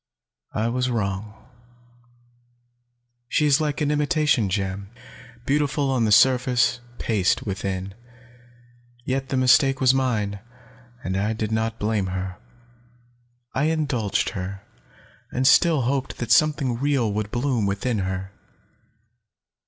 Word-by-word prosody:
I 110 +2 0
was 125 +2 0
wrong. 105 -2 -3 1.9
She 150 - +1
is 145 +1 +4
like 150 0 -2
an 150 -1 +1
imitation 150 - +1
gem 100 0 -3 0.6
beautiful 145 0 +1
on 125 -4 +1
the 105 - +1
surface, 125 +1 +4 0.2
paste 105 -5 +1
within. 95 -1 -4 1.1
Yet 135 0 -2
the 135 - -1
mistake 130 +1 +4
was 130 -1 +4
mine, 110 -7 -1 0.6
and 95 - -2
I 105 +3 0
did 110 -1 -3
not 110 0 -1
blame 105 -2 -1
her. 95 0 -4 1.2
I 140 - +1
indulged 140 -10 0
her, 95 +1 -6 0.7
and 130 +1 -1
still 155 +3 +5
hoped 135 +2 -2
that 120 -2 -4
something 140 -6 +3
real 135 -6 +1
would 105 0 -2
bloom 120 -3 0
within 100 +3 -1
her." 95 0 -3
120 Hz, 120 wpm, -23 LUFS, 100-135 Hz, 1.9 s, still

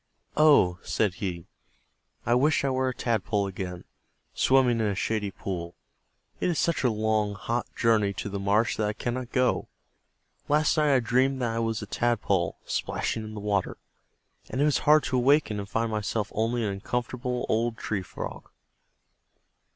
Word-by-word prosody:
"Oh," 140 - +5
said 105 -4 0
he, 90 -4 -3 0.8
"I 120 - +2
wish 145 +5 +3
I 135 - +1
were 130 0 +1
a - - -3
Tadpole 105 -4 0
again, 90 -2 -5 0.5
swimming 130 -3 +3
in 110 - +1
a 100 - -1
shady 105 +1 -1
pool. 90 -3 -5 0.6
It - - +1
is 170 - 0
such 170 -4 +1
a 125 - +4
long, 110 -1 0
hot 120 +3 -2
journey 110 -4 +3
to - - -5
the 100 0 -4
marsh 100 +3 +1
that 105 - +1
I 105 - -1
cannot 120 +2 -4
go. 125 -1 +1 0.8
Last 150 +2 +3
night 150 -2 +3
I 130 - +3
dreamed 130 +3 +2
that 120 - 0
I - - -1
was 115 -1 -1
a - - -5
Tadpole, 100 -6 0
splashing 110 - -2
in 110 0 -8
the - - -5
water, 100 -2 -1 0.7
and 130 - -3
it 145 - +4
was 150 -3 +2
hard 155 0 +7
to 130 - 0
awaken 125 -4 +3
and 100 -1 -6
find 115 +1 -1
myself 105 -1 -2
only 115 +2 0
an 105 - 0
uncomfortable 125 +5 -3
old 115 +1 0
Tree 105 -3 -2
Frog." 90 - -7
115 Hz, 175 wpm, -27 LUFS, 100-125 Hz, 0.8 s, hard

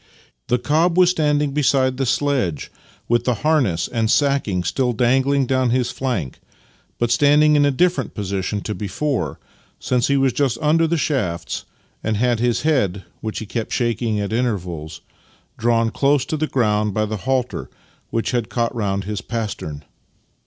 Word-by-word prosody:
The 125 - +2
cob 160 +7 +1
was 180 -1 +6
standing 150 -3 +1
beside 130 -2 +2
the 135 -1 -1
sledge, 125 - 0 0.4
with 120 0 +1
the 125 - +2
harness 130 - +2
and 115 -2 -1
sacking 135 -9 +1
still 125 +5 0
dangling 130 +4 +2
down 130 0 +1
his 125 0 +1
flank 110 - -3 0.3
— - - -36
but 120 -1 0
standing 150 +4 +5
in 145 -1 +4
a - - +4
different 175 +6 0
position 100 0 -2
to 105 - -4
before, 105 - -2 0.4
since 125 -1 +1
he 140 - +2
was 135 -2 +2
just 135 -5 0
under 160 +2 +3
the 170 +1 0
shafts, 90 - -2 0.4
and 110 -1 0
had 120 0 +1
his 120 +2 +1
head 105 - +1 0.2
(which 110 -1 -5
he 110 - -4
kept 110 +1 -4
shaking 115 -3 0
at 100 +1 -3
intervals) 90 -10 -3 0.6
drawn 115 0 +2
close 140 0 +2
to 155 - -2
the 155 0 -1
ground 105 -6 +1
by 110 - +1
the 110 0 -3
halter, 130 +3 -2 0.4
which 115 - -1
had 120 -3 -1
caught 115 -1 -1
round 100 -4 -1
his 105 -1 -4
pastern. 105 -10 -5
120 Hz, 165 wpm, -21 LUFS, 105-140 Hz, 0.6 s, was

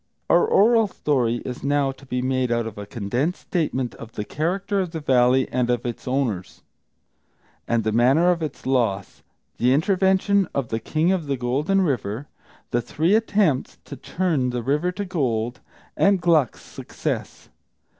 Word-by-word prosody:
Our 455 - +5
oral 225 - +4
story 125 -10 -1
is 125 -1 -6
now 140 -1 +1
to 135 +1 -16
be 125 -1 -2
made 130 -1 0
out 120 -1 0
of 110 -2 -7
a 100 - -7
condensed 120 - -2
statement 135 -8 -2
of 115 0 -11
the 105 - -4
character 190 - -1
of 185 -2 -1
the 160 - -3
Valley 130 -2 +3
and 125 -1 0
of 120 -1 0
its 120 0 -5
owners, 125 -9 -2 1.0
and 115 -1 +1
the 110 - 0
manner 135 +10 +4
of 170 -2 -1
its 155 -4 -5
loss; 115 -7 -1 0.4
the 125 +2 +2
intervention 190 +3 +2
of 135 -4 -1
the 110 - -1
King 155 - 0
of 175 -6 -1
the 140 -1 -1
Golden 145 +11 +1
River; 130 - -2 0.4
the 120 - +1
three 160 - 0
attempts 205 - +1
to - - -8
turn 165 -8 -1
the 125 -1 -3
river 150 +8 0
to 200 +2 -5
gold, 125 - -1 0.4
and 195 -1 +3
Gluck's 160 -7 +2
success. - - -5
135 Hz, 165 wpm, -23 LUFS, 120-175 Hz, 1.0 s, Our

